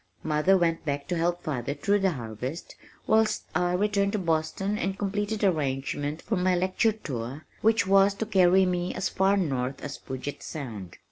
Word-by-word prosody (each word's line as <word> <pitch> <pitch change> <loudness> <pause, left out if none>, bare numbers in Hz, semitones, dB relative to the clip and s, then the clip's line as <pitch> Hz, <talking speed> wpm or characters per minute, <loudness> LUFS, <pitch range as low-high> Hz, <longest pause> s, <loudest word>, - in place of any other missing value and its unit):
Mother 155 +5 +3
went 165 -2 +1
back 145 -2 -3
to 180 - 0
help 175 +1 0
father 140 -3 -2
through 200 +8 +1
the 190 -2 +2
harvest, 125 +5 -6 0.3
whilst 220 0 +2
I 180 0 +1
returned 200 +1 +1
to - - +1
Boston 170 +3 -1
and 195 +1 -2
completed 205 +2 -2
arrangements 145 -3 -1
for 220 - -1
my 180 0 +2
lecture 185 +5 +2
tour 135 - -6 0.2
which 220 -3 +3
was 195 +1 +4
to 220 - -2
carry 190 -2 +4
me 180 0 -1
as 185 0 -1
far 195 +1 +2
north 135 -7 -1
as 145 - -6
Puget 130 +2 -6
Sound. 110 - -7
175 Hz, 175 wpm, -27 LUFS, 145-195 Hz, 0.3 s, was